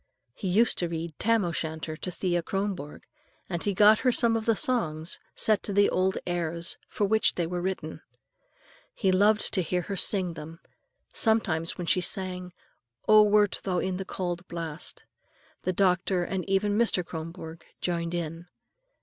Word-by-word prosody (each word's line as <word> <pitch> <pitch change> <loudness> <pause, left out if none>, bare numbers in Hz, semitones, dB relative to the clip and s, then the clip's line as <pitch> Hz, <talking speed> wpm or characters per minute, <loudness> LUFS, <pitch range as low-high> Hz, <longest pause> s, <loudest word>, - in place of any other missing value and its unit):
He 190 - -5
used 220 +6 +3
to 175 - 0
read 165 0 -4
"Tam 230 -3 +2
o'Shanter" 160 -2 -3
to 180 - -6
Thea 175 -1 -1
Kronborg, 190 -5 -4 0.4
and 170 -3 -3
he 200 -2 -1
got 210 +2 +6
her 255 - +3
some 235 -1 +3
of 225 0 -2
the 225 - +4
songs, 165 -10 0 0.2
set 215 -2 +3
to 205 - -4
the 205 +1 +4
old 190 +1 +1
airs 170 -1 -2
for 205 - 0
which 220 +2 +3
they 175 - 0
were 175 +1 -3
written. 180 -4 -4 0.9
He 190 -4 +2
loved 210 +3 +3
to 190 - +2
hear 180 +1 -1
her 200 - -4
sing 185 -2 +2
them. 160 +1 -9 0.5
Sometimes 185 -8 +1
when 175 - -4
she 180 - +2
sang, 180 -1 -3 0.6
"Oh, 215 0 +8
wert 210 -1 +3
thou 185 -2 -1
in 185 0 -1
the 195 - -3
cauld 175 -2 -4
blast," 165 -2 -6 0.6
the 185 - 0
doctor 185 -1 +2
and 190 +1 -3
even 205 +1 +2
Mr. 215 -5 +2
Kronborg 165 0 -7 0.2
joined 170 -1 -2
in. 165 0 -4
180 Hz, 165 wpm, -27 LUFS, 170-205 Hz, 0.9 s, Oh